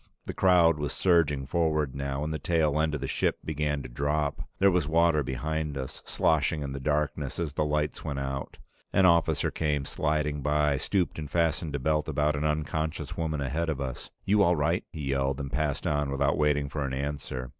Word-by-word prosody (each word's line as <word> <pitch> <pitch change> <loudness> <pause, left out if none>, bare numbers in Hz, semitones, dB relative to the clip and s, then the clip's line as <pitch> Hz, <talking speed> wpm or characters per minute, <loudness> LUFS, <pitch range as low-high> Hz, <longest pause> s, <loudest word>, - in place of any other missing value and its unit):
The - - -4
crowd 85 -4 +4
was 75 -2 -2
surging 80 -7 +2
forward 75 -2 0
now, 70 +1 -3
and 80 +1 -2
the 80 - -3
tail 75 -1 +1
end 80 -1 0
of 75 - -5
the 70 - -2
ship - - 0
began 75 -2 -1
to - - -6
drop. 70 +3 -1 0.2
There 100 0 +5
was 90 -5 +1
water 80 -1 +3
behind 75 +3 -3
us, 65 -1 -6
sloshing 80 -1 +1
in 70 - -4
the 70 - -4
darkness 75 0 -1
as 80 -4 -2
the 75 - 0
lights 75 0 -1
went 75 -3 -3
out. 70 0 -4 0.3
An 95 - +4
officer 85 -3 +3
came 75 -3 -1
sliding 75 -1 -1
by, 75 0 +2
stooped, 90 +2 -1
and 75 -2 -6
fastened 80 -1 0
a - - -1
belt 75 +3 0
about 75 +1 +1
an 75 +1 -2
unconscious 80 +1 -2
woman 80 -3 -2
ahead 80 +5 -1
of 75 -4 -2
us. 65 -2 -5 0.2
"You 105 +1 +4
all 90 -3 +4
right?" 80 +4 +1
he 70 -4 -3
yelled, 70 0 0
and 70 -1 -5
passed 75 +1 -1
on 75 -1 0
without 70 +1 +1
waiting 75 -1 +2
for 75 +1 -3
an 65 -1 -2
answer. 70 -2 -4
75 Hz, 205 wpm, -28 LUFS, 70-80 Hz, 0.3 s, There